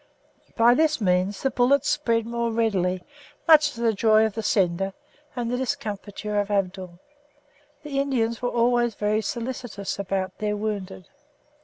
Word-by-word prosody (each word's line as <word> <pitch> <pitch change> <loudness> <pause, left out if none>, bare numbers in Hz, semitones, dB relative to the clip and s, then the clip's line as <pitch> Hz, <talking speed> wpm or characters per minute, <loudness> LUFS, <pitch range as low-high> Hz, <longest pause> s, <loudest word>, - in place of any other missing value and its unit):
By 235 +1 +6
this 310 +2 +2
means 185 0 0
the 270 - +1
bullets 255 +3 +2
spread 230 -7 +1
more 235 0 -2
readily, 190 -5 0 0.4
much 305 -2 +6
to 235 - -8
the 230 -1 +2
joy 215 +1 +4
of 220 - -2
the 225 - -3
sender 195 -2 +1 0.4
and 240 -2 -2
the 250 - 0
discomfiture 210 -5 -3
of 205 0 -1
Abdul. 190 -3 -2 0.9
The 285 -2 -3
Indians 235 -5 0
were 245 - 0
always 240 -1 +2
very 210 +1 0
solicitous 230 -3 -5
about 190 -1 -2
their 210 0 -1
wounded. 200 -3 -4
220 Hz, 150 wpm, -24 LUFS, 200-245 Hz, 0.9 s, By